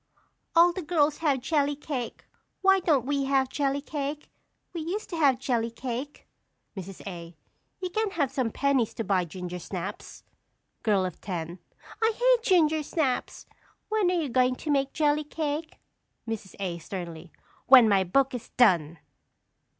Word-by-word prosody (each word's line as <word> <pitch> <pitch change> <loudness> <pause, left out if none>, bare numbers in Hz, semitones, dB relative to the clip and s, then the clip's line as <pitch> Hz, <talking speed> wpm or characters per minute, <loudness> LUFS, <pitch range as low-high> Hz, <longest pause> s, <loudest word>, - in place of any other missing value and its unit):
All 345 +1 +6
the 370 - -4
girls 305 -3 +1
have 285 -5 +1
jelly 290 0 +1
cake. 275 -5 -5 0.4
Why 385 0 +6
don't 300 -9 +2
we 280 0 0
have 270 -1 +2
jelly 280 0 -1
cake? 290 0 -5 0.4
We 335 - -4
used 390 +8 -4
to - - -3
have 280 -6 +4
jelly 240 -3 -1
cake. 250 +4 -6 0.5
Mrs. 190 -1 -8
A. 170 -3 -8 0.4
You 365 - -2
can 435 +2 0
have 295 -8 -1
some 260 -4 0
pennies 270 -2 +1
to 225 - -2
buy 190 -3 +1
ginger 180 +1 -6
snaps. - - -7 0.6
Girl 200 -4 +2
of 180 - -6
Ten. 175 -2 -5 0.4
I 445 0 +3
hate - - +4
ginger 315 -6 +3
snaps! 290 -3 -2 0.4
When 430 -4 +2
are 365 - +1
you 300 -4 -2
going 255 +1 +2
to 300 - -4
make 275 -1 +1
jelly 300 -1 +1
cake? 300 +1 -4 0.5
Mrs. 220 -4 -5
A. 180 -3 -3
(sternly). 170 -1 -7 0.4
When 255 -3 +9
my 200 -2 +4
book 265 +9 +2
is 245 - -6
done. 170 -9 +4
275 Hz, 160 wpm, -27 LUFS, 205-310 Hz, 0.6 s, When